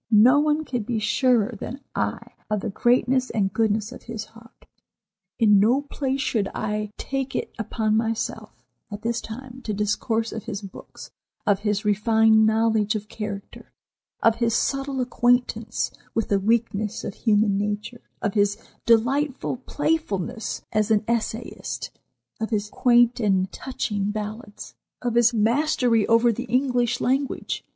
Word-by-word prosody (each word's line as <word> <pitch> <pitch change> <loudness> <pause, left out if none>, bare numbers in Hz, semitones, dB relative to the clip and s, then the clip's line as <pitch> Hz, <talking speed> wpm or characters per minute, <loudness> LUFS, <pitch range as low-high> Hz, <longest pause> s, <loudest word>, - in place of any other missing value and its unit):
No 235 +6 +6
one 300 +1 +1
can 245 -4 -2
be 225 +2 -2
surer 240 0 +2
than 260 +4 -6
I - - -3 0.2
of 210 -2 0
the 215 - -3
greatness 250 +3 +2
and 195 -3 0
goodness 220 0 +1
of - - -10
his 225 -2 -6
heart. 230 +1 -19 0.7
In 210 -3 +5
no 245 +8 +3
place 275 -1 -2
should 215 -7 0
I 210 0 -2
take 270 -1 -3
it - - -3
upon 220 0 0
myself 225 0 -2 0.4
at 205 0 -8
this 235 0 -1
time 250 +3 -9
to 215 -4 -3
discourse 220 +2 -1
of 220 - -6
his 210 -2 -5
books, 195 - -11 0.3
of 200 -2 +3
his 210 0 -1
refined 220 +1 +4
knowledge 220 -1 +2
of 210 0 -5
character, 205 -3 -7 0.5
of 225 0 +4
his 230 -1 +1
subtle 275 0 0
acquaintance 245 -2 +1 0.2
with 225 - 0
the 200 - +3
weakness 215 0 0
of - - -4
human 210 -2 +2
nature, 210 +4 -3 0.2
of 205 -3 0
his 205 -1 +2 0.3
delightful 255 +4 +2
playfulness 240 - -2
as 215 0 +1
an 215 -1 +3
essayist, 235 0 -3 0.5
of 220 - -2
his 210 -2 -2
quaint 240 -1 +4
and 190 -4 +1
touching 210 -6 -3
ballads, 210 0 -6 0.3
of 240 -2 0
his 235 0 +5
mastery 235 0 +2
over 230 +1 +5
the 245 +3 -4
English 245 -1 +1
language. 270 +2 -1
225 Hz, 145 wpm, -24 LUFS, 210-245 Hz, 0.7 s, No